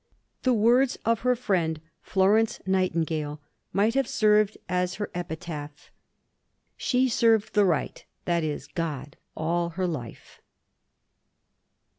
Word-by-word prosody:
The 255 - +2
words 240 +4 +3
of 230 0 +2
her 250 0 +2
friend, 175 -9 0 0.2
Florence 205 +4 +2
Nightingale, 165 -5 0 0.3
might 210 +3 +2
have 270 -1 +1
served 215 -1 +3
as 180 0 -1
her 205 - -4
epitaph—"She 165 - -5
served 225 -2 +2
the 210 -2 +4
Right, 170 -5 -1 0.2
that 170 -2 +1
is, 150 -2 -3
God, 145 -3 -4 0.2
all 170 +2 0
her 185 - +1
life." 145 -10 -6
185 Hz, 110 wpm, -26 LUFS, 160-220 Hz, 0.3 s, the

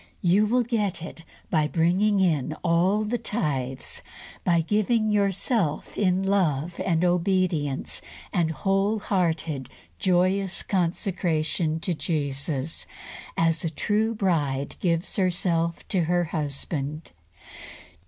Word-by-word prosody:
You 190 +4 +4
will 245 +3 +3
get 210 -8 -1
it 165 - -9 0.3
by 155 -2 +3
bringing 185 +6 +2
in 155 -5 +1
all 180 +5 +3
the 230 +3 -1
tithes, 135 - -2 0.4
by 170 -2 +3
giving 215 +4 +1
yourself 200 - 0
in 185 -1 +2
love 175 -5 0
and 170 -1 +2
obedience 175 -5 +1 0.3
and 170 -2 +2
wholehearted, 180 - 0 0.3
joyous 185 +1 +2
consecration 170 -3 0
to 180 - -1
Jesus, 145 -2 -2 0.5
as 165 -1 +2
a 165 - 0
true 215 +7 0
bride 145 -9 0
gives 170 -1 0
herself 170 -3 0
to 180 -4 +1
her 175 +1 +2
husband. 150 -1 -3
175 Hz, 105 wpm, -26 LUFS, 160-195 Hz, 0.5 s, You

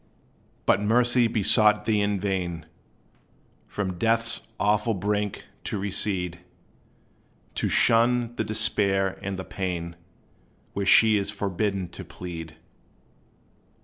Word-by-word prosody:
But 95 - +3
Mercy 120 +3 +3
besought 105 -1 +4
thee 110 -2 +1
in 100 -1 0
vain, 90 -4 -3 1.0
From 95 -4 -4
death's 115 0 +2
awful 105 +3 +1
brink 105 +1 -2 0.2
to - - -2
recede; 95 -3 -1 1.1
To - - -1
shun 120 +1 +3
the 110 - -1
despair 100 -3 0
and 100 -1 -4
the 95 - -6
pain 85 -3 -4 0.8
Where 100 -1 -3
she 110 +1 +6
is 100 0 -2
forbidden 100 -1 -2
to - - -9
plead. 80 -3 -8
100 Hz, 110 wpm, -25 LUFS, 95-110 Hz, 1.1 s, she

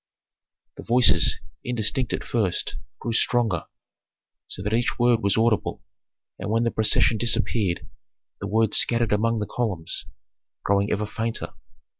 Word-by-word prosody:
" - - -68 0.7
Authentic. - - -57
The - - -9
voices, 120 -10 +5 0.2
indistinct 120 +1 0
at - - -3
first, 105 -7 -1 0.2
grew 115 - -4
stronger, 115 -7 +1 0.8
so 95 - -7
that 105 +2 -2
each 115 +1 0
word 120 -1 +3
was 100 +1 +2
audible, 110 -1 0 0.6
and 95 - -5
when 115 +2 +1
the 115 - 0
procession 110 0 +2
disappeared 105 -4 0 0.5
the 100 - -5
words 110 +1 +2
scattered 115 -2 +2
among 115 +2 +1
the 105 - -2
columns, 100 -9 -3 0.6
growing 100 +1 +1
ever 105 +1 -1
fainter. 115 +2 -4
110 Hz, 145 wpm, -24 LUFS, 100-115 Hz, 0.8 s, voices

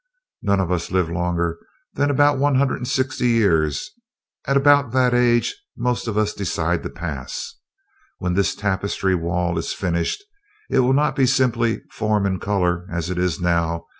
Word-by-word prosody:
"No, 100 - +1
none 100 - +2
of 90 -1 -2
us 90 -2 -1
live 90 -3 0
longer 85 -1 -1 0.3
than 145 - +1
about 145 0 +3
one 145 0 +2
hundred 135 0 +2
and 125 - -5
sixty 130 -1 0
years 100 - +1 0.6
at 140 - +3
about 140 -3 +4
that 125 -1 +3
age 120 - +2 0.2
most 125 -1 -1
of 110 -2 -2
us 105 -1 +1
decide - - -1
to - - -5
pass. - - -6 0.6
When 90 -1 -2
this 100 +2 +1
tapestry 100 -1 -1
wall 85 0 -1
is 80 - -3
finished, 85 - -2 0.5
it - - +3
will 130 +1 +3
not 150 +2 +2
be 135 -2 +3
simply 120 -3 +1
form 105 -2 0
and 95 -3 -1
color, 90 -3 0
as 85 0 -3
it 90 - -2
is 90 -1 0
now. 85 -1 0
100 Hz, 175 wpm, -21 LUFS, 85-125 Hz, 0.6 s, about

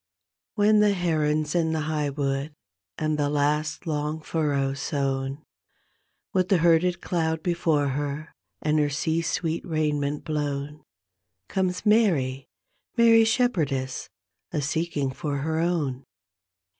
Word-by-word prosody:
Wben 210 +1 +5
the 210 -1 +4
heron's 155 -3 0
in 165 -2 +1
the 160 - 0
hig^ 150 -2 -2
wood 140 +1 -1 0.4
and 155 -1 -1
the 145 -1 +1
last 150 +3 0
long 150 0 -2
furrow's 140 -4 -1
sown 135 0 -2 0.9
With 185 -1 +1
the 195 - +5
herded 170 +1 +3
cloud 160 -2 -1
before 160 -5 +1
her 145 +3 -4 0.3
and 155 0 +2
her 145 -1 +2
sea 160 +4 0
sweet 165 0 -2
raiment 150 -4 -1
blown 150 -1 -3 0.7
Comes 185 -1 -1
Mary, 160 - +2 0.5
Mary 230 -1 +7
Shepherdess, 160 - 0 0.4
a - - -1
seeking 150 -2 -1
for 140 +1 -3
her 160 +3 -1
own. 155 -7 -1
155 Hz, 120 wpm, -26 LUFS, 145-170 Hz, 0.9 s, Mary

